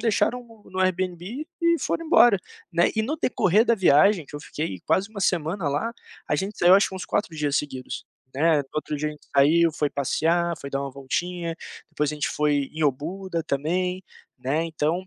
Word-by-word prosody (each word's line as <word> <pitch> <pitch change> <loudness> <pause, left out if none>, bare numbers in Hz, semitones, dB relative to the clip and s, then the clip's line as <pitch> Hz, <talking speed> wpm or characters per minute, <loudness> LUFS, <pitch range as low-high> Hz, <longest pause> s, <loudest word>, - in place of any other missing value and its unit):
deixaram 240 +2 +1
no 220 -4 -18
no 185 0 -3
Airbnb 185 - -1 0.2
e 335 0 +4
foram 330 - -2
embora, 240 - +6 0.3
né. 170 +1 +3
E 220 - +1
no 270 +9 -2
decorrer 215 - +2
da 235 - +3
viagem 180 -1 +4
que 145 - -8
eu - - -8
fiquei 145 - -5
quase 195 +2 +1
1 210 -2 -8
semana 170 0 0
lá, 150 +12 -1 0.3
a 150 - +1
gente 200 +5 -4
saiu 180 +2 +7
acho 200 - +4
que 190 - -8
uns 185 - -6
4 185 -6 -1
dias 145 -2 0
seguidos, 130 -3 -4 0.3
né, 155 +2 +3
no 135 -2 -4
outro 155 0 -2
dia 150 +1 -1
a - - -5
gente 150 - -17
saiu, 160 +4 +5
foi 150 -1 0
passear, 165 +5 0
foi 140 - -6
dar 140 0 -2
uma 140 - -4
voltinha, 165 +5 -3 0.3
depois 150 0 -1
a - - -4
gente 150 - -1
foi 145 -2 +1
em 160 -1 0
Obuda 165 +5 -2
também, 180 +6 -1 0.3
né, 140 +6 0
então 165 +3 -1
170 Hz, 205 wpm, -25 LUFS, 150-190 Hz, 0.3 s, saiu